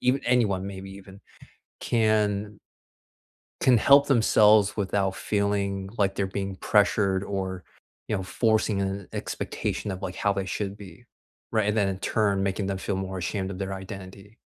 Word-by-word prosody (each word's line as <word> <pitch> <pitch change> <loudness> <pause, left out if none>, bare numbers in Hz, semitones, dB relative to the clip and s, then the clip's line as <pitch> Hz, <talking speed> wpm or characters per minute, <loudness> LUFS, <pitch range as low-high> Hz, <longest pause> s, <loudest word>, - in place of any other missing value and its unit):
even 130 +2 +2
anyone 105 -6 +2
maybe 95 0 -7
even, 95 0 -12 0.6
can 105 -2 +1 1.0
can 125 -2 +5
help 140 +5 +6
themselves 110 -5 +4
without 95 -1 0
feeling 100 -2 -1
like 100 -2 +2
they're 100 -1 -1
being 95 0 -4
pressured 100 -2 +2
or, 95 -2 -4 0.4
you - - 0
know, 95 - -2
forcing 110 0 +1
a 95 0 -4
expectation - - -3
of, 95 0 -6
like, 90 - -3
how 100 - +1
they 100 -1 -2
should 100 +1 -4
be, 105 +4 -13 0.5
right, 110 -2 +1
and 105 - 0
then 105 -3 +2
in 95 - -2
turn, 100 -3 +1
making 95 0 -1
them 95 - -2
feel 95 +1 -3
more 95 0 -4
ashamed 95 +1 -3
of 95 - -6
their 95 0 -3
identity. 95 +2 -9
100 Hz, 160 wpm, -26 LUFS, 95-105 Hz, 1.0 s, help